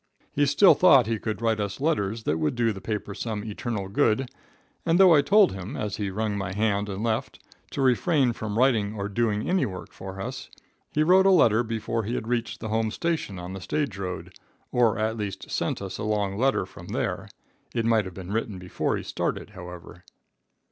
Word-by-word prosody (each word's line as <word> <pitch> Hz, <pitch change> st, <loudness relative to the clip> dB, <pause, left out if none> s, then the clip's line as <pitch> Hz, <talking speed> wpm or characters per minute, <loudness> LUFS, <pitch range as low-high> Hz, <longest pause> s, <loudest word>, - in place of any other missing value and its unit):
He 145 Hz, 0 st, +2 dB
still 160 Hz, +8 st, +6 dB
thought 135 Hz, -9 st, +6 dB
he 110 Hz, 0 st, -1 dB
could 110 Hz, 0 st, -4 dB
write 110 Hz, -2 st, +2 dB
us 100 Hz, -2 st, -3 dB
letters 115 Hz, -8 st, 0 dB
that 80 Hz, -, 0 dB
would 75 Hz, +5 st, 0 dB
do 115 Hz, -2 st, +1 dB
the 95 Hz, -, -9 dB
paper 105 Hz, -1 st, -4 dB
some 105 Hz, -1 st, -4 dB
eternal 105 Hz, -2 st, -4 dB
good, 115 Hz, +5 st, +1 dB, 0.5 s
and 170 Hz, +2 st, +2 dB
though 185 Hz, -3 st, +8 dB
I 150 Hz, -, +6 dB
told 205 Hz, +4 st, +5 dB
him, 95 Hz, 0 st, -6 dB
as 105 Hz, -2 st, -3 dB
he 105 Hz, -2 st, -2 dB
wrung 105 Hz, +2 st, -2 dB
my 100 Hz, -2 st, -3 dB
hand 105 Hz, 0 st, 0 dB
and 100 Hz, +2 st, -4 dB
left, 115 Hz, -1 st, -1 dB, 0.3 s
to 135 Hz, -, -2 dB
refrain 130 Hz, 0 st, +3 dB
from 110 Hz, -1 st, -4 dB
writing 115 Hz, -5 st, +2 dB
or 100 Hz, -1 st, -3 dB
doing 105 Hz, 0 st, 0 dB
any 185 Hz, 0 st, +2 dB
work 95 Hz, -2 st, -8 dB
for 95 Hz, 0 st, -8 dB
us, 130 Hz, +5 st, -6 dB, 0.4 s
he 155 Hz, -, +2 dB
wrote 185 Hz, +4 st, +5 dB
a -, -, +7 dB
letter 120 Hz, -, +5 dB
before 115 Hz, 0 st, -2 dB
he 115 Hz, +4 st, -3 dB
had 110 Hz, -, -4 dB
reached 120 Hz, -1 st, -2 dB
the 110 Hz, -, -4 dB
home 110 Hz, 0 st, +1 dB
station 160 Hz, -, -2 dB
on 90 Hz, +1 st, -6 dB
the 95 Hz, -, -7 dB
stage 140 Hz, +1 st, -2 dB
road, 95 Hz, -2 st, -5 dB, 0.4 s
or 120 Hz, -2 st, +3 dB
at 110 Hz, +1 st, -1 dB
least 100 Hz, -3 st, -5 dB
sent -, -, -1 dB
us 95 Hz, -1 st, -6 dB
a -, -, -3 dB
long 105 Hz, -2 st, 0 dB
letter 135 Hz, +5 st, +1 dB
from -, -, -13 dB
there. -, -, -3 dB, 0.5 s
It 115 Hz, -1 st, 0 dB
might 115 Hz, -3 st, +3 dB
have 95 Hz, -2 st, -8 dB
been 95 Hz, 0 st, -7 dB
written 110 Hz, -2 st, -2 dB
before 90 Hz, 0 st, -2 dB
he -, -, -6 dB
started, -, -, -3 dB
however. 90 Hz, -2 st, -10 dB
110 Hz, 210 wpm, -26 LUFS, 100-120 Hz, 0.5 s, though